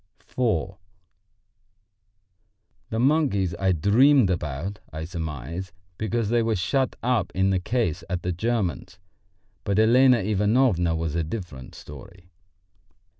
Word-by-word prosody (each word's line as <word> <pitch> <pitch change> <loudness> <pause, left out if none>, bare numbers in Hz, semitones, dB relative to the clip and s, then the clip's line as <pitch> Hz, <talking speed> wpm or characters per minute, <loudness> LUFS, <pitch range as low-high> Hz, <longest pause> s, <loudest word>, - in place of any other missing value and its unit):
IV 95 -7 0 2.1
The 110 - -3
monkeys 125 - +2
I 95 -1 +2
dreamed 110 - +4
about, 85 +3 -4
I 80 0 -5
surmise, 85 +1 -6 0.3
because 110 0 -1
they 120 0 +2
were 115 -1 0
shut 130 +9 0
up 125 -1 0
in 95 +1 +2
the 95 - +1
case 90 -5 -1
at 90 -1 -3
the 90 - -1
German's; 105 0 -2 0.7
but 100 0 -1
Elena 125 +3 +5
Ivanovna 105 -4 +1
was 80 -2 -2
a 85 0 0
different 80 - -7
story. 90 +5 -13
95 Hz, 120 wpm, -24 LUFS, 85-115 Hz, 2.1 s, Elena